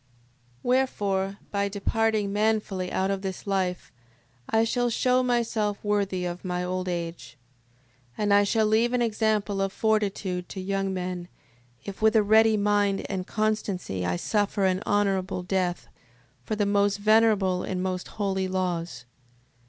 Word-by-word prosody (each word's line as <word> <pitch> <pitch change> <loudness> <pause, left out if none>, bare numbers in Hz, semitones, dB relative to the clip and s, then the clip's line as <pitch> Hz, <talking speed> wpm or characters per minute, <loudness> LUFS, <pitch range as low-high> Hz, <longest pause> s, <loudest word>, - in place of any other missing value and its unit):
6:27. 130 - -39 0.6
Wherefore, 200 -7 0
by 200 0 0
departing 210 0 0
manfully 210 -3 0
out 190 +1 0
of 195 -1 -2
this 190 -2 -5
life, 190 -3 -1 0.6
I 225 0 +3
shall 245 +1 +1
shew 250 +2 +2
myself 230 -4 0
worthy 200 -3 0
of 175 0 -5
my 180 -1 -2
old 185 0 -2
age: 170 -3 -5 0.8
6:28. - - -2
And 205 -1 +3
I 205 0 +6
shall 220 +2 +2
leave 225 +3 +2
an 245 -1 +2
example 215 -3 0
of 195 0 0
fortitude 200 -4 -1
to 195 - -6
young 195 +1 -1
men, 180 -1 -4 0.6
if 200 0 -7
with 220 +1 +4
a 215 - +5
ready 220 +1 +5
mind 205 -1 +1
and 185 -2 -3
constancy 205 - -2
I 90 0 0
suffer 205 - 0
an 185 0 +1
honourable 195 -2 0
death, 180 -1 -1 0.6
for 215 - -2
the 205 -1 +1
most 200 0 +2
venerable 210 -3 +3
and 185 -1 -3
most 185 -1 -3
holy 190 -2 0
laws. 175 -9 -3
200 Hz, 150 wpm, -26 LUFS, 185-215 Hz, 0.8 s, I